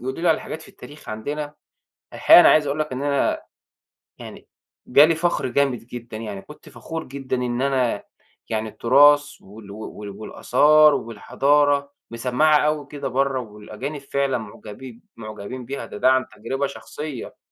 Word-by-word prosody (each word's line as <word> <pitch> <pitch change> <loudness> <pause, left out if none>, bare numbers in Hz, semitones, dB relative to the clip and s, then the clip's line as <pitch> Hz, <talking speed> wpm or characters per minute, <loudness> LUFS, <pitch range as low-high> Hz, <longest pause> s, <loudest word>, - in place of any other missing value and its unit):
يقولوا 130 +5 -5
لي 175 - +3
على 160 - +3
حاجات 160 - -7
في - - -15
التاريخ 150 +1 -14
عندنا. 145 +7 -5 0.6
الحقيقة - - +7
أنا - - +7
عايز 155 -1 +4
أقول 145 +2 -2
لك 155 -2 -2
إن 130 +2 -4
أنا 140 -1 0 0.8
يعني - - -11 0.4
جالي 150 +5 +6
فخر 170 -4 0
جامد 130 -1 +1
جدًا 120 -2 -8
يعني. 105 -3 -6
كنت 150 - -15
فخور 160 0 -7
جدًا 135 -1 -5
إن 125 -1 -2
أنا 130 -6 0 0.5
يعني 110 -1 -2
التراث 145 +6 +4
وال 100 +1 -13
وال 105 0 -8
والآثار 145 +9 +3
والحضارة 140 +5 +1 0.2
مَسَمَّعة 125 +6 +2
أوي 150 -2 -2
كده 145 -1 -5
برّا، 135 +1 0
والأجانب 110 +6 -8
فعلًا 140 -1 -1
معجبين، 110 +2 -10
معجبين 110 +3 -8
بيها، 135 +3 -5
ده - - -9
ده 130 +5 +4
عن 130 0 +2
تَجرُبة 135 +6 -2
شخصية. 135 +3 -8
130 Hz, 155 wpm, -22 LUFS, 115-145 Hz, 0.8 s, الحقيقة